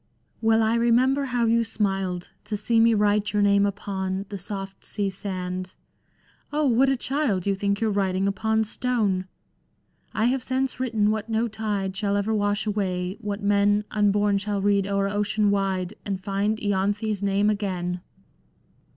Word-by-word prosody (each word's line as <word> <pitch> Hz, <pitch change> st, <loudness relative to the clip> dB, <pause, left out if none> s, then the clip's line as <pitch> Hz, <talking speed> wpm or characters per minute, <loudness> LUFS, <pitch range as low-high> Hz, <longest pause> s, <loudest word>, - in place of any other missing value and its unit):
" -, -, -45 dB
Well 225 Hz, 0 st, +4 dB
I 220 Hz, +1 st, +2 dB
remember 245 Hz, +4 st, +3 dB
how 245 Hz, -3 st, 0 dB
you 230 Hz, +1 st, +3 dB
smiled 195 Hz, -5 st, -2 dB
To 210 Hz, 0 st, -3 dB
see 225 Hz, +2 st, +1 dB
me 230 Hz, 0 st, +5 dB
write 210 Hz, 0 st, +2 dB
your 205 Hz, -1 st, +3 dB
name 200 Hz, 0 st, +4 dB
upon 195 Hz, -1 st, -3 dB
The 200 Hz, -, -5 dB
soft 195 Hz, 0 st, -6 dB
sea 200 Hz, -2 st, -2 dB
sand...! 185 Hz, -1 st, -5 dB, 0.7 s
what 270 Hz, -3 st, +3 dB
a 270 Hz, -, +1 dB
child 255 Hz, -, 0 dB
I -, -, +1 dB
You -, -, 0 dB
think 200 Hz, +1 st, 0 dB
you^re 220 Hz, -2 st, 0 dB
writing 190 Hz, -1 st, +1 dB
upon 220 Hz, +2 st, +1 dB
stone! 215 Hz, -5 st, 0 dB, 0.9 s
I 220 Hz, -, +2 dB
have 255 Hz, +2 st, +1 dB
since 260 Hz, 0 st, -1 dB
written 220 Hz, -5 st, +1 dB
what 220 Hz, +1 st, -3 dB
no 225 Hz, +1 st, +1 dB
tide 205 Hz, -3 st, -3 dB
Shall 200 Hz, +1 st, 0 dB
ever 205 Hz, +2 st, 0 dB
wash 205 Hz, 0 st, 0 dB
away, 190 Hz, -3 st, -2 dB
what 205 Hz, -1 st, -4 dB
men 205 Hz, +1 st, +3 dB
Unborn 205 Hz, -1 st, +2 dB
shall 205 Hz, 0 st, -2 dB
read 200 Hz, 0 st, +2 dB
o'er 200 Hz, 0 st, +1 dB
ocean 205 Hz, +1 st, +1 dB
wide, 195 Hz, -1 st, -1 dB
And 195 Hz, -2 st, -3 dB
find 200 Hz, +2 st, -1 dB
lanthe's 205 Hz, +1 st, -1 dB
name 200 Hz, +1 st, +2 dB
again." 180 Hz, -4 st, -2 dB
205 Hz, 165 wpm, -25 LUFS, 195-220 Hz, 0.9 s, me